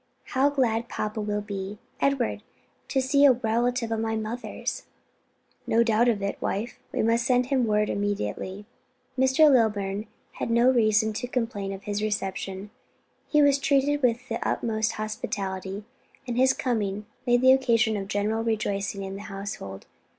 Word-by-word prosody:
How 270 Hz, +2 st, +4 dB
glad 235 Hz, -5 st, 0 dB
papa 215 Hz, +1 st, -3 dB
will 210 Hz, 0 st, -1 dB
be, 200 Hz, 0 st, -5 dB, 0.2 s
Edward, 275 Hz, -4 st, 0 dB, 0.5 s
to 265 Hz, -, +1 dB
see 280 Hz, +2 st, +3 dB
a 275 Hz, -2 st, +8 dB
relative 235 Hz, 0 st, 0 dB
of 225 Hz, -, 0 dB
my 225 Hz, 0 st, -1 dB
mother's!" 220 Hz, +3 st, -4 dB, 0.8 s
"No 230 Hz, +1 st, +4 dB
doubt 230 Hz, +1 st, +3 dB
of 205 Hz, -4 st, 0 dB
it, 200 Hz, -, -3 dB
wife, 215 Hz, +5 st, -3 dB
and -, -, 0 dB
we -, -, +2 dB
must 235 Hz, +1 st, +2 dB
send 250 Hz, 0 st, +3 dB
him 260 Hz, -2 st, +1 dB
word 210 Hz, 0 st, +2 dB
immediately." 200 Hz, -, -3 dB, 0.5 s
Mr. 265 Hz, +4 st, +5 dB
Lilburn 210 Hz, -5 st, +2 dB, 0.2 s
had -, -, -4 dB
no 235 Hz, +2 st, +5 dB
reason 220 Hz, -2 st, +3 dB
to 245 Hz, -, -4 dB
complain 225 Hz, -6 st, -2 dB
of 195 Hz, 0 st, -7 dB
his 205 Hz, 0 st, -2 dB
reception: 195 Hz, -1 st, -3 dB, 0.6 s
he 300 Hz, -1 st, +4 dB
was 285 Hz, -1 st, +4 dB
treated 285 Hz, 0 st, +2 dB
with 250 Hz, 0 st, +1 dB
the -, -, -3 dB
utmost 220 Hz, -1 st, 0 dB
hospitality, 195 Hz, -2 st, -4 dB, 0.4 s
and 240 Hz, -, -2 dB
his 260 Hz, +2 st, +5 dB
coming 210 Hz, -6 st, -2 dB, 0.2 s
made 245 Hz, 0 st, +4 dB
the 260 Hz, 0 st, +7 dB
occasion 230 Hz, -4 st, +2 dB
of 195 Hz, -1 st, -4 dB
general 210 Hz, +3 st, 0 dB
rejoicing 205 Hz, -3 st, -1 dB
in 195 Hz, 0 st, -5 dB
the -, -, -8 dB
household. 195 Hz, -, -6 dB
220 Hz, 160 wpm, -26 LUFS, 205-250 Hz, 0.8 s, a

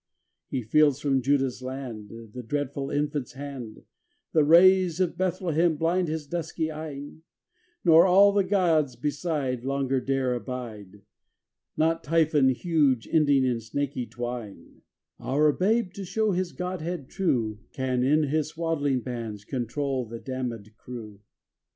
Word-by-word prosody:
XXV -, -, -11 dB
He -, -, -1 dB
feels 145 Hz, +4 st, +3 dB
from 140 Hz, -2 st, +1 dB
Juda's 135 Hz, -1 st, +1 dB
land 130 Hz, -5 st, -6 dB, 0.2 s
The 125 Hz, -, -6 dB
dreaded 140 Hz, +2 st, -3 dB
Infant's 145 Hz, -3 st, -2 dB
hand; 135 Hz, -5 st, -8 dB, 0.5 s
The 155 Hz, -3 st, +5 dB
rays 180 Hz, +2 st, +6 dB
of 180 Hz, -2 st, +1 dB
Bethlehem 175 Hz, -3 st, +1 dB
blind 175 Hz, +3 st, +1 dB
his 155 Hz, -1 st, -3 dB
dusky 160 Hz, 0 st, -3 dB
eyn; 150 Hz, -1 st, -7 dB, 0.7 s
Nor 165 Hz, +1 st, +7 dB
all 200 Hz, +2 st, +6 dB
the 200 Hz, -1 st, +2 dB
gods 170 Hz, -9 st, +2 dB
beside 140 Hz, -1 st, -2 dB
Longer 135 Hz, -1 st, 0 dB
dare 135 Hz, -2 st, 0 dB
abide, 110 Hz, -6 st, -7 dB, 0.7 s
Not 165 Hz, +1 st, +1 dB
Typhon 155 Hz, -3 st, +3 dB
huge 140 Hz, -3 st, +1 dB
ending 145 Hz, -4 st, +4 dB
in 125 Hz, -2 st, 0 dB
snaky 130 Hz, +1 st, -3 dB
twine: 120 Hz, -3 st, -7 dB, 0.4 s
Our 150 Hz, +3 st, +2 dB
Babe, 200 Hz, +4 st, +1 dB
to 200 Hz, -, -6 dB
show 210 Hz, +3 st, 0 dB
his 180 Hz, -1 st, -1 dB
Godhead 180 Hz, -4 st, -4 dB
true, 115 Hz, -, -1 dB
Can 130 Hz, -2 st, -1 dB
in 150 Hz, +5 st, +3 dB
his 150 Hz, +1 st, 0 dB
swaddling 155 Hz, -5 st, -1 dB
bands 115 Hz, -5 st, -6 dB
control 130 Hz, +1 st, -2 dB
the 115 Hz, +1 st, -7 dB
damned 125 Hz, -5 st, -5 dB
crew. 110 Hz, -6 st, -9 dB
145 Hz, 135 wpm, -26 LUFS, 125-165 Hz, 0.7 s, Nor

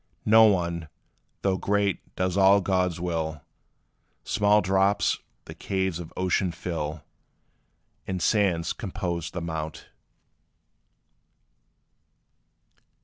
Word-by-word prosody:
No 110 Hz, +1 st, +7 dB
one, 85 Hz, -5 st, 0 dB, 0.5 s
though 95 Hz, -1 st, +2 dB
great, 100 Hz, -1 st, -1 dB
does 90 Hz, -1 st, -1 dB
all 100 Hz, +1 st, +6 dB
God's 90 Hz, -3 st, 0 dB
will 80 Hz, -4 st, -3 dB, 0.8 s
Small 105 Hz, 0 st, +3 dB
drops 95 Hz, +1 st, +2 dB, 0.3 s
the -, -, -9 dB
caves 95 Hz, -3 st, -2 dB
of 85 Hz, -2 st, -8 dB
ocean 90 Hz, 0 st, +1 dB
fill; 80 Hz, -3 st, -4 dB, 1.0 s
And 95 Hz, -1 st, -2 dB
sands 90 Hz, -3 st, +1 dB
compose 90 Hz, -6 st, -4 dB
the 85 Hz, -, -5 dB
mount. 80 Hz, -1 st, -5 dB
90 Hz, 90 wpm, -26 LUFS, 85-100 Hz, 1.0 s, No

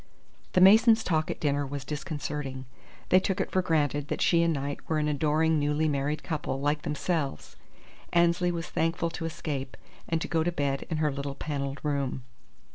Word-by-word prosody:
The 185 Hz, -, +4 dB
Masons' 220 Hz, +4 st, +7 dB
talk 155 Hz, -2 st, 0 dB
at -, -, -4 dB
dinner 145 Hz, -1 st, +1 dB
was 140 Hz, -1 st, -5 dB
disconcerting. 145 Hz, -3 st, -4 dB, 0.4 s
They 185 Hz, -, +6 dB
took 190 Hz, 0 st, -1 dB
it -, -, -1 dB
for 185 Hz, -, +2 dB
granted 145 Hz, -4 st, 0 dB
that -, -, -3 dB
she 170 Hz, -1 st, +4 dB
and 170 Hz, 0 st, +3 dB
Knight 140 Hz, -1 st, -3 dB
were 160 Hz, -, +1 dB
an 150 Hz, 0 st, +1 dB
adoring 155 Hz, +2 st, +2 dB
newly 150 Hz, +2 st, +1 dB
married 145 Hz, +1 st, -1 dB
couple, 145 Hz, -5 st, -3 dB
like 145 Hz, +2 st, 0 dB
themselves. 150 Hz, -1 st, -2 dB, 0.6 s
Annesley 175 Hz, +1 st, +3 dB
was 165 Hz, -1 st, -3 dB
thankful 165 Hz, 0 st, -1 dB
to 165 Hz, -, -5 dB
escape, 150 Hz, -5 st, -4 dB, 0.3 s
and 165 Hz, -, +1 dB
to -, -, -3 dB
go 165 Hz, -2 st, +1 dB
to 175 Hz, -, 0 dB
bed 140 Hz, -4 st, -2 dB
in 160 Hz, -, -1 dB
her 155 Hz, -1 st, +1 dB
little 140 Hz, 0 st, -4 dB
panelled 140 Hz, -2 st, -4 dB
room. 140 Hz, -4 st, -1 dB
150 Hz, 185 wpm, -28 LUFS, 140-165 Hz, 0.6 s, Masons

